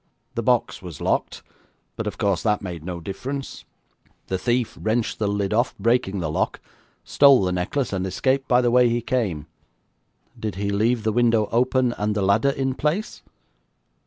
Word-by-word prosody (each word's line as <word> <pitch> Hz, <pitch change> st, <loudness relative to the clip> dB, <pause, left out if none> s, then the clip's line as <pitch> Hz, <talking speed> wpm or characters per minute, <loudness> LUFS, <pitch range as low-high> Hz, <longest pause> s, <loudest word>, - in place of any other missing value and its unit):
The -, -, -2 dB
box -, -, +1 dB
was 90 Hz, -6 st, -9 dB
locked, -, -, -1 dB, 0.5 s
but, 115 Hz, -, -4 dB
of 100 Hz, -1 st, -4 dB
course, 100 Hz, -5 st, +1 dB
that 105 Hz, -2 st, 0 dB
made 85 Hz, -4 st, -6 dB
no 90 Hz, 0 st, -5 dB
difference. 130 Hz, +10 st, -6 dB, 0.6 s
The 95 Hz, -, -1 dB
thief 120 Hz, +2 st, 0 dB
wrenched 110 Hz, +1 st, -1 dB
the 105 Hz, -, 0 dB
lid 100 Hz, 0 st, -1 dB
off, 120 Hz, +3 st, +1 dB
breaking 100 Hz, -3 st, +1 dB
the 75 Hz, -2 st, -2 dB
lock, -, -, -1 dB, 0.4 s
stole 140 Hz, -6 st, +5 dB
the 90 Hz, -, 0 dB
necklace, 95 Hz, +7 st, -2 dB
and 95 Hz, -1 st, -1 dB
escaped 130 Hz, +8 st, 0 dB
by 125 Hz, 0 st, +4 dB
the 120 Hz, -1 st, +2 dB
way 125 Hz, 0 st, +5 dB
he 120 Hz, 0 st, -1 dB
came.' 105 Hz, -, -1 dB, 0.9 s
'Did 105 Hz, -3 st, -4 dB
he 100 Hz, +1 st, -2 dB
leave 110 Hz, +3 st, +1 dB
the 110 Hz, -1 st, 0 dB
window 115 Hz, -2 st, +3 dB
open, 125 Hz, +1 st, +2 dB
and 105 Hz, 0 st, 0 dB
the 105 Hz, -, 0 dB
ladder 100 Hz, +7 st, +3 dB
in 135 Hz, -1 st, -1 dB
place?' 155 Hz, +10 st, -2 dB
110 Hz, 175 wpm, -23 LUFS, 95-125 Hz, 0.9 s, stole